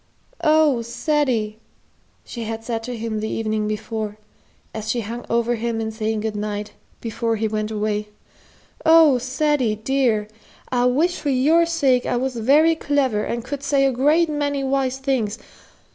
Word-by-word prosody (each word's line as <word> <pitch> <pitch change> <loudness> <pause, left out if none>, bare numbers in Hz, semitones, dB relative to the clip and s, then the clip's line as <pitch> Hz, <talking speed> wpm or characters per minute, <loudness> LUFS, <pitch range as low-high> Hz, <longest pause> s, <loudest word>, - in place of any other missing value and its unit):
"Oh, 305 -5 +4
Ceddie!" 235 -3 -1 0.7
she 235 -2 -6
had 225 0 -5
said 225 -1 -3
to 245 -1 -5
him 220 -1 -3
the 220 +1 -3
evening 215 -1 -1
before, 215 0 -4 0.6
as 220 0 -5
she 235 +1 0
hung 230 +3 -6
over 235 +1 +1
him 230 0 -2
in 220 0 -2
saying 220 0 -2
good 220 -1 -3
night, 210 0 -4 0.3
before 230 0 -1
he 220 0 -1
went 215 0 -2
away; 210 -1 -2 0.8
"oh, 320 -5 +6
Ceddie, 260 -2 0
dear, 225 -2 0 0.4
I 245 -1 +1
wish 315 +9 +2
for 290 - -2
your 305 +6 +3
sake 275 -7 +2
I 245 - 0
was 260 +1 -2
very 290 +8 +4
clever 275 -9 0
and 235 0 -3
could 280 +1 -5
say 280 -1 +2
a 270 - +3
great 300 +7 +3
many 290 -2 -1
wise 265 -1 0
things! 260 -6 -1
240 Hz, 160 wpm, -22 LUFS, 220-275 Hz, 0.8 s, oh